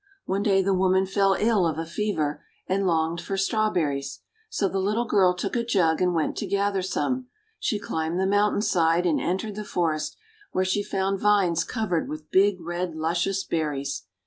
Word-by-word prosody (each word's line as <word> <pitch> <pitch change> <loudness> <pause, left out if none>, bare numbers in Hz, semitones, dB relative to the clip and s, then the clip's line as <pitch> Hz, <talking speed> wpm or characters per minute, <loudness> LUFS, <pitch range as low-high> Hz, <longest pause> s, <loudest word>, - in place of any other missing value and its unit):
One 195 +1 -1
day 195 -2 +3
the 195 +1 +2
woman 190 0 +3
fell 195 0 +2
ill 210 -5 +3
of 160 -2 -2
a 165 - -3
fever, 165 -5 -2 0.2
and 195 +1 0
longed 165 0 +1
for 195 - -4
Strawberries. 175 -10 0 0.3
So 200 - 0
the 195 +1 -2
little 210 +5 0
girl 190 -5 +3
took 180 - -3
a 235 - +1
jug 180 -9 +2
and 180 -1 +2
went 160 - 0
to - - -3
gather 200 -1 0
some. 255 +7 -2 0.3
She 220 - 0
climbed 160 -3 -2
the 190 - +2
mountain 205 +1 +2
side, 170 -3 +2
and 165 -3 +2
entered 190 +4 -2
the 210 +1 -5
forest, 165 -6 -1 0.4
where 185 - +1
she 190 +2 +1
found 195 -1 -1
vines 190 -5 +3
covered 200 -6 -2
with 155 0 -8
big, 195 0 +4
red, 175 0 -3
luscious 170 +5 0
berries. 140 - -2
190 Hz, 185 wpm, -25 LUFS, 165-200 Hz, 0.4 s, big